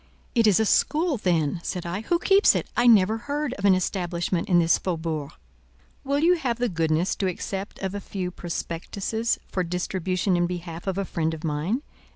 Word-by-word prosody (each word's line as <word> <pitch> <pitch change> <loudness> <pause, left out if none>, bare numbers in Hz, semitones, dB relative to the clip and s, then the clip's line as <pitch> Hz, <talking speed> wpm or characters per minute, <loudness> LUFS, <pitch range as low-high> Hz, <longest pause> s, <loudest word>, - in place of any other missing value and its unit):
"It 230 -3 +4
is 205 -2 +5
a 220 - +3
school 310 - +2
then?" 170 -5 0
said 180 0 -4
I. 175 +4 -3
"Who 345 +10 +1
keeps 390 +3 +5
it? - - -1
I 240 - +3
never 215 -1 +5
heard 285 +2 -3
of 200 - -4
an 195 -2 +6
establishment 175 -1 -1
in 175 - +5
this 170 -1 +4
faubourg." 160 -5 -3 0.7
"Will 280 +1 0
you 345 +4 +4
have 245 -7 -1
the 245 0 0
goodness 165 0 0
to 195 - 0
accept 195 +2 -4
of 190 0 -2
a 205 - -3
few 185 -2 -4
prospectuses 190 +6 -3
for 185 - -1
distribution 180 +1 -1
in 175 0 +2
behalf 175 0 -6
of 190 -1 -1
a 195 - -1
friend 160 -2 -1
of 160 - -11
mine?" 165 - -1
185 Hz, 195 wpm, -25 LUFS, 170-225 Hz, 0.7 s, an